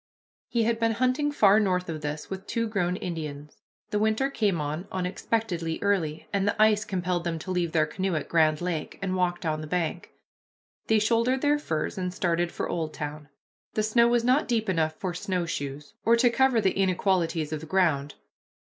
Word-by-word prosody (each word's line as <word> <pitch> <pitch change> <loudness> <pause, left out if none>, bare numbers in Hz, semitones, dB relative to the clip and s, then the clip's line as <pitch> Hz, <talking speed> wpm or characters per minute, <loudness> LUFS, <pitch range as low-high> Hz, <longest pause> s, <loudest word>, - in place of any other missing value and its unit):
He 235 -2 +1
had 225 0 +1
been 225 -1 +2
hunting 255 +5 +1
far 210 -6 +5
north 185 -3 +1
of 160 -2 -5
this 150 0 -4
with 190 +1 -7
two 230 -1 -1
grown 180 -4 0
Indians. 150 -5 -6 0.3
The 210 - +1
winter 220 +6 +1
came 205 -9 +1
on 150 +5 -3
unexpectedly 180 -2 -2
early, 170 -7 0
and 200 0 +1
the 205 - 0
ice 215 -1 +5
compelled 180 -4 -2
them 170 -1 -2
to 185 +4 -6
leave 175 -2 0
their 155 -2 +3
canoe 185 +3 -2
at 155 - -2
Grand 155 -2 +3
Lake, 175 -3 -3
and 190 -1 -2
walk 180 -1 0
down 155 -2 -1
the 155 - -6
bank. 175 0 -2 0.8
They 220 - +4
shouldered 230 +4 +2
their 295 0 +3
furs 160 - -3
and 180 -1 -2
started 175 -1 0
for - - -3
Oldtown. 155 -3 -4 0.5
The 215 - +1
snow 235 +2 +4
was 240 -1 +2
not 255 +5 +3
deep 225 -4 0
enough 160 -3 +1
for 185 0 -4
snowshoes, 165 -7 -3
or 230 - +5
to 240 +1 +4
cover 265 -1 +3
the 195 -3 +2
inequalities 180 -4 +1
of 155 - -2
the 160 - -10
ground. 155 -6 +1
185 Hz, 190 wpm, -27 LUFS, 160-220 Hz, 0.8 s, far